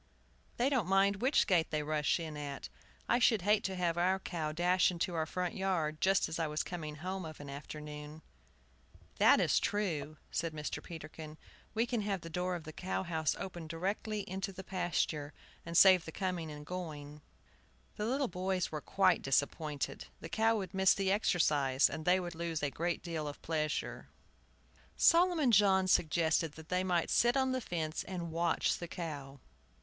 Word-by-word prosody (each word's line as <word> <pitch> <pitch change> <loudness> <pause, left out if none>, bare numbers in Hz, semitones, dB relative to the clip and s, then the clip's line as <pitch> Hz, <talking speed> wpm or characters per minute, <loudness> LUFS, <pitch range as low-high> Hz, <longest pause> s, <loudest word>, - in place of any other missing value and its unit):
They 245 - +2
don't 255 -10 +1
mind 195 +1 +3
which 260 +7 +3
gate 175 -5 +2
they 155 -1 -1
rush 150 +2 +1
in 160 -2 -5
at. 145 -2 -6 0.4
I 240 - +3
should 225 -6 +4
hate 210 +2 +3
to 190 - -2
have 175 -2 0
our 185 +2 +3
cow 165 -5 -3
dash 175 +3 +3
into 180 0 -2
our 160 -1 -1
front 180 +2 -2
yard 165 -5 -1
just 195 0 +3
as 160 - -4
I 165 - +1
was 150 +1 -1
coming 155 -4 -6
home 185 +5 -4
of 155 -2 -8
an 145 -1 -8
afternoon." 150 +1 -8 1.0
"That - - +6
is - - +3
true," 155 -8 -2
said 165 0 -2
Mr. 150 -1 -4
Peterkin; 155 -1 -9 0.4
"we 225 +2 +2
can 240 -2 -1
have 200 -3 -2
the 165 - -9
door 180 +2 -1
of 170 - -6
the 155 0 -9
cow 185 +3 -3
house 160 -3 0
open 175 -4 -6
directly 200 +6 -2
into 190 +1 -3
the 190 0 -9
pasture, 175 -5 -1 0.3
and 170 0 0
save 185 -3 +7
the 160 - -7
coming 180 -3 -3
and 150 0 -9
going." 150 -4 -6 0.7
The 210 - -2
little 270 +2 +1
boys 185 -1 -2
were 155 -1 -4
quite 185 0 +2
disappointed. 145 +2 -1
The 165 - -8
cow 225 +3 +2
would 190 -4 -5
miss 190 -1 +4
the 195 -1 0
exercise, 150 -9 +3
and 155 - -5
they 180 +1 +4
would 175 -2 -5
lose 165 -2 -3
a 145 - 0
great 170 +3 -2
pleasure. 155 -2 -3 0.9
Solomon 335 -6 +5
John 190 -3 +5
suggested 160 -2 +2
that 160 0 -13
they 180 0 +1
might 180 -2 0
sit 240 +2 +4
on 265 -1 +2
the 255 0 -1
fence 160 -6 -3
and 175 -3 -5
watch 170 0 +1
the 175 - -5
cow. 145 -5 -6
170 Hz, 180 wpm, -33 LUFS, 155-190 Hz, 1.0 s, save